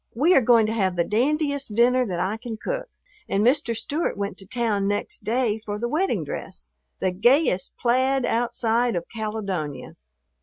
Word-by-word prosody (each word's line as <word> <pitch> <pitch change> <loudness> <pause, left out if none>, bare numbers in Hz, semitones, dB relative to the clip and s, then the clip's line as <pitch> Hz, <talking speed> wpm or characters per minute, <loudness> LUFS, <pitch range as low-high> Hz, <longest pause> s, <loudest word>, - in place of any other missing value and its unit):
We 310 +10 +4
are 270 - +6
going 230 -2 +5
to 215 - -1
have 190 -5 0
the 170 - +2
dandiest 280 - 0
dinner 250 +2 +4
that 180 -3 -3
I 190 +5 -1
can 225 -1 -6
cook, - - -4 0.4
and 200 +2 +1
Mr. 250 -2 +2
Stewart 285 +7 -2
went 200 0 -3
to 195 - -11
town 215 -5 0
next 205 +1 -3
day 225 0 0
for 205 -1 -4
the 235 +3 -2
wedding 335 +9 0
dress, - - -7 0.3
the 185 - 0
gayest 220 - +2
plaid 260 +2 +2
outside 235 -1 +1
of 170 - -2
Caledonia. 200 -9 -4
230 Hz, 175 wpm, -24 LUFS, 205-255 Hz, 0.4 s, are